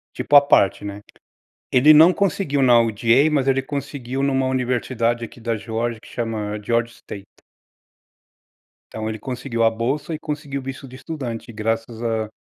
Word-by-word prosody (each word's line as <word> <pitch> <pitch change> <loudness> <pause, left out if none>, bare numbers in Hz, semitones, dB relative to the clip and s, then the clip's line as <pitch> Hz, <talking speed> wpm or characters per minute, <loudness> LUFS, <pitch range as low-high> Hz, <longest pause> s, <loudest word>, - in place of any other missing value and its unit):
Tipo 145 - +3
à - - +11
parte, 100 -7 +3
né? 100 0 -6 0.7
Ele 150 +5 +7
não 160 +4 +7
conseguiu 175 -7 0
na 120 -2 +6
UGA, 115 +6 +3
mas 135 -2 +1
ele 135 0 +2
conseguiu 140 -2 -5
numa 135 -1 +1
universidade 125 -2 -1
aqui 115 - -12
da 115 0 -2
Georgia, 115 +1 -3
que - - -18
chama 105 -3 -4
Georgia 115 +1 0
State. 100 -3 -10 1.7
Então 110 0 -4
ele 110 0 -4
conseguiu 120 0 -3
a 115 - +5
bolsa 135 +8 -3
e - - -4
conseguiu 150 -2 -5
o - - -13
visto 135 +1 -7
de 130 - -11
estudante, 130 -5 -6
graças 115 +1 -3
a 110 -2 -2
120 Hz, 165 wpm, -21 LUFS, 115-140 Hz, 1.7 s, à